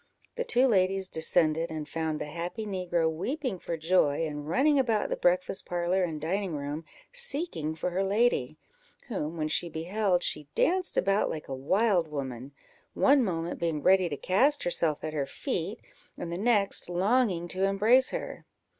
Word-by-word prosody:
The - - -1
two 260 - +3
ladies 190 -4 +2
descended, 160 -1 +1
and 155 -2 -5
found 160 -1 -2
the - - -3
happy 170 +8 -5
negro 180 -4 0
weeping 220 - -3
for 170 - -4
joy, 165 -2 +2
and 150 -1 -5
running 280 - +3
about 230 -5 +1
the - - 0
breakfast 180 +2 0
parlour 175 +2 0
and 160 -4 -3
dining 180 +2 -2
room, 145 +3 -5 0.3
seeking 295 - -3
for 180 +3 -3
her 190 +2 0
lady, 195 - +1 0.5
whom, 165 -7 -3
when 155 -1 -1
she 170 +2 0
beheld, 180 +3 0
she 150 -1 -2
danced 365 +1 +1
about 195 +2 +2
like 155 - -5
a 135 - -5
wild 180 - +2
woman; 135 -3 -5 0.4
one 275 -1 +5
moment 170 -4 -3
being 160 -4 -1
ready 185 -2 +4
to 145 - -4
cast 260 - +2
herself 165 -3 0
at 155 - -4
her 140 -3 -1
feet, - - -3 0.4
and 170 - -5
the 170 - -3
next 205 -5 +1
longing 185 -1 +1
to 190 +2 0
embrace 215 +7 +4
her. - - -6
175 Hz, 170 wpm, -28 LUFS, 160-210 Hz, 0.5 s, one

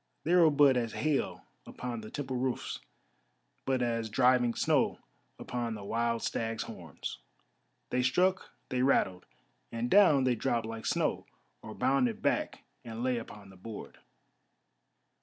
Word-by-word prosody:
They 170 - +1
were 170 -3 +7
but 145 -3 +5
as 115 -2 -1
hail 150 -2 -1 0.2
upon 120 -2 -5
the 110 - -9
temple 135 -3 -4
roofs, 130 0 -2 0.9
but 130 -2 +1
as 115 -2 -1
driving 125 +1 +3
snow - - +2 0.4
upon 120 -2 -3
the 105 - -8
wild 115 +2 -1
stag's 115 0 -2
horns. - - -8 0.7
They 125 - +2
struck, 180 +9 +2 0.2
they 125 -1 0
rattled, 95 -9 +2 0.4
and 115 +1 -3
down 160 -10 +6
they 130 -1 +3
dropped 115 0 -1
like 115 0 -5
snow, - - 0 0.3
or 110 - -9
bounded 125 -2 +1
back - - 0 0.2
and 115 0 -6
lay 125 -2 +1
upon 105 -3 -11
the 95 - -16
board. 105 +3 -9
120 Hz, 140 wpm, -31 LUFS, 115-130 Hz, 0.9 s, were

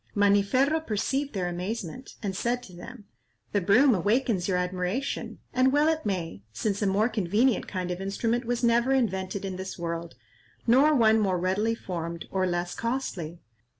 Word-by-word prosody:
Maniferro 205 +9 +3
perceived 270 +3 -1
their 185 -3 -1
amazement, 185 +6 -5
and 195 -2 -2
said 245 +4 -1
to 185 - -12
them, 210 +5 -10 0.5
"The 205 - +1
broom 240 +9 +5
awakens 205 0 +1
your 185 -2 +1
admiration,—and 185 +7 -1
well 295 +2 +3
it 315 -7 -1
may, 170 - -3
since 200 - -2
a 205 - +2
more 200 +3 +3
convenient 220 +2 +1
kind 180 -2 -3
of 180 +1 -4
instrument 230 +5 -1
was 240 +1 -1
never 235 +3 +3
invented 195 -6 -1
in 190 -1 -4
this 190 0 -6
world, 170 -1 -4 0.5
nor 275 +6 +5
one 220 -3 +5
more 190 -4 +1
readily 195 +6 0
formed, 170 -5 -5
or 190 -1 +1
less 175 0 -2
costly. 195 -9 -3
205 Hz, 160 wpm, -27 LUFS, 180-240 Hz, 0.5 s, broom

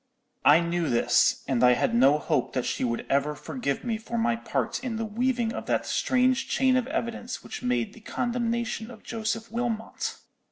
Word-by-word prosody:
I 155 +4 +7
knew 170 -1 -1
this, 120 0 +3
and 130 -3 +1
I 125 0 +7
had 120 - +1
no 135 +5 +5
hope 150 - -1
that 125 -2 -1
she - - -2
would 120 -2 -1
ever 140 +2 +1
forgive 145 - -3
me 230 -3 -2
for 235 +1 -5
my 235 +1 +2
part 235 - -2
in 245 -3 -2
the 225 0 -2
weaving 235 +1 0
of - - -6
that - - +1
strange 255 +1 +2
chain 260 -1 +3
of 255 -1 +1
evidence 245 -4 -4
which - - -7
made 125 -2 0
the - - -13
condemnation 235 -1 -2
of 230 -3 -12
Joseph 225 0 -3
Wilmot. 230 -1 -3
225 Hz, 190 wpm, -27 LUFS, 145-240 Hz, -, I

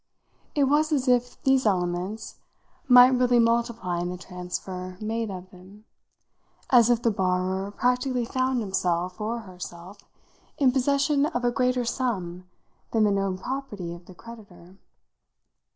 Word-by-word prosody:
It 290 - +3
was 300 +3 +2
as 275 -3 0
if 245 -1 +1
these 265 -3 +3
elements 185 +3 -2 0.5
might 250 0 +9
really 250 -1 +3
multiply 230 -6 +1
in 175 0 -2
the 180 - -5
transfer 180 +1 -7
made 225 +1 -3
of 185 -1 -8
them; 195 +4 -16 0.9
as 240 -3 +6
if 240 -1 +2
the 230 - +3
borrower 190 0 -1
practically 250 +3 0
found 255 0 0
himself 185 -2 -1
or 230 +2 -2
herself 185 0 -10 0.5
in 270 -3 +4
possession 280 +2 +2
of 245 -4 -3
a 240 - +3
greater 250 -1 0
sum 185 -8 -3 0.4
than 225 -2 +2
the 210 - +3
known 195 -1 -1
property 210 -8 -5
of 175 +1 -13
the 185 - -13
creditor. 195 -5 -14
215 Hz, 140 wpm, -25 LUFS, 185-250 Hz, 0.9 s, might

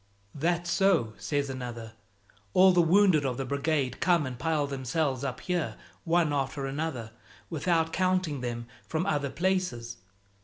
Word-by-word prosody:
"That's 175 +3 0
so," 180 - +3
says 145 -2 -1
another; 120 -4 -6 0.6
"all 190 +1 +7
the 180 -1 +4
wounded 175 -2 +4
of 130 -3 -1
the 135 - -2
Brigade 140 -1 -1
come 170 -4 +3
and 125 -2 -6
pile 155 +1 +1
themselves 135 0 -1
up 135 -2 -3
here 170 -12 -1 0.3
one 165 -3 +2
after 140 0 -1
another, 135 -5 -3 0.4
without 165 0 +1
counting 185 -6 +1
them 120 -1 -4 0.2
from 160 +3 -1
other 145 -7 0
places. 170 -10 -1
145 Hz, 145 wpm, -28 LUFS, 130-175 Hz, 0.6 s, all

